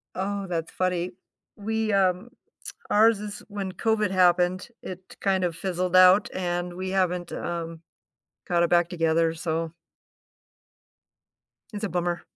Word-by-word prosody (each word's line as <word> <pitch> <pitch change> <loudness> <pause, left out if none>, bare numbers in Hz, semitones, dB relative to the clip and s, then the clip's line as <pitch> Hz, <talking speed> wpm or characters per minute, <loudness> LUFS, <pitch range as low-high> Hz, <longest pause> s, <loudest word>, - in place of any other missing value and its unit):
Oh, 200 +1 -2
that's 165 -3 -3
funny. 180 -1 -1 0.4
We, 220 +1 -1
um 190 +3 +1 0.6
ours 220 +1 +5
is 210 0 -7
when 200 -2 -4
COVID 215 -1 0
happened, 180 +1 +3
it 185 0 -9
kind 190 -2 +1
of 170 -2 -2
fizzled 185 0 -1
out, 185 +2 +7
and 175 -1 -2
we 185 0 -4
haven't, 180 -2 0
um, 165 -1 -4 0.7
got 175 -1 +2
it 170 - +1
back 175 -1 +3
together, 165 -1 +1
so 165 0 -3 2.0
it's 205 +1 -4
a - - 0
bummer. 175 -1 -2
185 Hz, 130 wpm, -26 LUFS, 175-195 Hz, 2.0 s, out